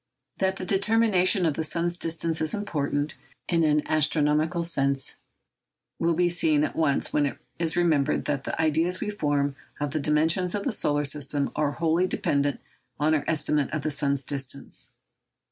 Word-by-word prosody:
That 190 0 +1
the 185 - -6
determination 195 -2 +3
of 160 - +2
the 160 - -3
sun's 170 +2 0
distance 165 -1 -1
is 155 -1 +1
important, 145 -7 -2 0.3
in 165 -2 +2
an 150 -1 +2
astronomical 155 +2 +1
sense, 140 -5 0 0.8
will 165 0 +1
be 175 +1 +2
seen 160 -4 +2
at - - -2
once 155 -4 +1
when 145 -1 +2
it - - -6 0.2
is 165 -2 +1
remembered 155 -5 +1
that 140 -2 -1
the - - -4
ideas 160 +3 +1
we 210 - -3
form 145 -7 -1 0.2
of 145 -1 -2
the 155 - -1
dimensions 160 +5 +1
of 205 - -2
the 270 - -1
solar 145 -8 +1
system 140 0 -1
are 145 -1 0
wholly 165 +3 +1
dependent 145 -4 0 0.4
on 155 +2 +2
our 150 - +1
estimate 150 -2 0
of 155 -2 -3
the 155 - -1
sun's 140 -2 +1
distance. 140 0 -3
155 Hz, 170 wpm, -26 LUFS, 145-170 Hz, 0.8 s, determination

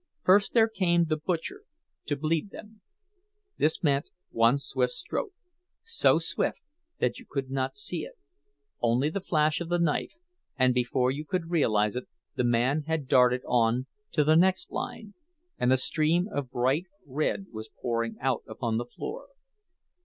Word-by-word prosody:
First 195 +4 +4
there 225 -1 +6
came 175 -6 +2
the 155 -1 0
"butcher," 175 - -3 0.5
to 145 - 0
bleed 155 +5 -1
them; 210 +1 -12 0.8
this 155 +3 +2
meant 140 -1 +1 0.2
one 115 +4 +4
swift 130 -3 -1
stroke, 430 - -3 0.5
so 455 +1 +4
swift - - -1 0.3
that - - 0
you 250 - -14
could 135 -2 -3
not 135 0 -1
see 180 -6 -3
it—only 140 -2 -4
the 200 - -3
flash 155 -3 +1
of 170 - -4
the 175 - +2
knife; 170 -4 0 0.4
and 130 -1 +4
before 125 +1 +1
you 145 +3 -4
could 170 +1 -3
realize 110 -10 +2
it, 125 - -4 0.3
the - - 0
man 120 +5 +2
had 160 -4 -1
darted 125 -1 +4
on 120 +1 +2 0.3
to 150 - +3
the 155 +2 +4
next 185 +3 +3
line, 210 -2 -5 0.5
and 125 - +2
a 130 - +5
stream 160 +6 +2
of 140 -3 -3
bright 130 +8 0 0.2
red 150 +7 -1
was 110 -1 -8
pouring 115 -1 -2
out 130 -2 0
upon 110 0 -2
the 120 - -2
floor. 445 - -7
145 Hz, 160 wpm, -28 LUFS, 125-170 Hz, 0.8 s, there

